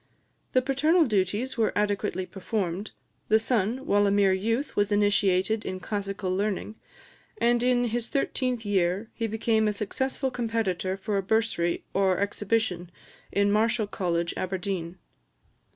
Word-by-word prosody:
The 255 - +3
paternal 305 +6 +3
duties 215 +4 0
were 220 - +2
adequately 205 -2 0
performed: 195 0 -3 0.4
the 220 - +5
son, 230 +3 0
while 205 -7 +3
a - - +3
mere 200 -1 +4
youth, 230 +9 -1
was 205 0 +1
initiated 205 0 +2
in 185 - -4
classical 195 -2 -3
learning, 205 +1 -2 0.6
and 240 - +2
in 245 0 +3
his 235 0 -2
thirteenth 255 -4 -1
year 195 +1 0
he 225 - -2
became 220 0 +1
a 210 - +1
successful 265 +6 -2
competitor 220 -6 -1
for 200 +1 -2
a - - +1
bursary 195 -4 0
or 190 -2 +2
exhibition 200 -3 -1 0.4
in 200 0 +2
Marischal 220 +1 +2
College, 170 -4 -1
Aberdeen. 185 -2 -3
205 Hz, 135 wpm, -27 LUFS, 190-230 Hz, 0.6 s, the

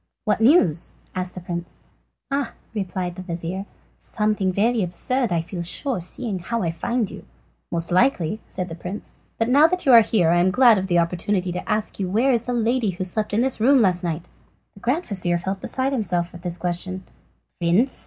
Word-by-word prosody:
"What 215 0 +1
news?" 220 - +4 0.2
asked 185 0 -4
the 180 - -6
prince. 175 0 -6 0.5
"Ah!" 275 -3 -1 0.2
replied 185 -3 -3
the - - -5
vizir, 180 +2 -5 0.3
"something 210 -3 0 0.3
absurd, 220 +7 -1
I 170 -1 +1
feel 175 +1 -6
sure, 205 - -2
seeing 195 +3 -5
how 230 +6 -2
I 165 - 0
find 235 +6 -1
you." - - -10 0.5
"Most 170 +1 -1
likely," 190 - +2
said 185 -1 -4
the 165 - -7
prince; 180 +5 -7 0.2
"but 225 - +1
now 285 +5 +6
that 365 +1 -2
you 270 - +5
are 235 -2 +10
here 205 -6 +2
I 175 - +4
am 180 +2 +4
glad 230 +1 +6
of 190 - -3
the 175 -2 +2
opportunity 180 +2 0
to 180 - -5
ask 210 -1 -1
you 190 -2 -1
where 235 +8 +3
is 235 -2 +1
the 245 - -2
lady 235 -1 +1
who 185 +1 -3
slept 210 +4 -1
in 210 +3 +2
this 260 -1 +1
room 265 +5 +5
last 185 -5 +2
night?" 170 -1 -3 0.5
The - - -16
grand 270 - 0
vizir 180 -4 0
felt 190 +2 -4
beside 265 +1 -1
himself 180 -9 0
at 175 - -10
this 175 -1 -2
question. 180 +2 -3 0.6
"Prince!" 185 +10 +2
190 Hz, 200 wpm, -23 LUFS, 175-235 Hz, 0.6 s, are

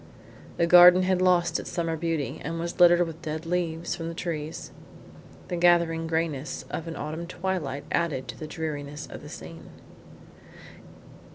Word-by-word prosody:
The 170 - +3
garden 180 +1 +8
had 185 0 +1
lost 180 -2 +3
its - - -7
summer 165 -2 -2
beauty 165 -2 -3
and 165 +3 -4
was 170 +2 -5
littered 175 0 +6
with 165 0 -9
dead 155 0 -5
leaves 170 -1 -2
from 165 -2 -5
the 165 - -5
trees. 160 -3 -5 0.8
The 175 - -2
gathering 170 -1 +3
greyness 160 -3 -2
of 165 - -4
an 165 - -5
autumn 160 +3 -5
twilight 175 -6 -3
added 155 -6 -1
to - - -5
the 155 - -6
dreariness 150 -1 -5
of - - -10
the - - -10
scene. - - -10
165 Hz, 160 wpm, -26 LUFS, 160-175 Hz, 0.8 s, garden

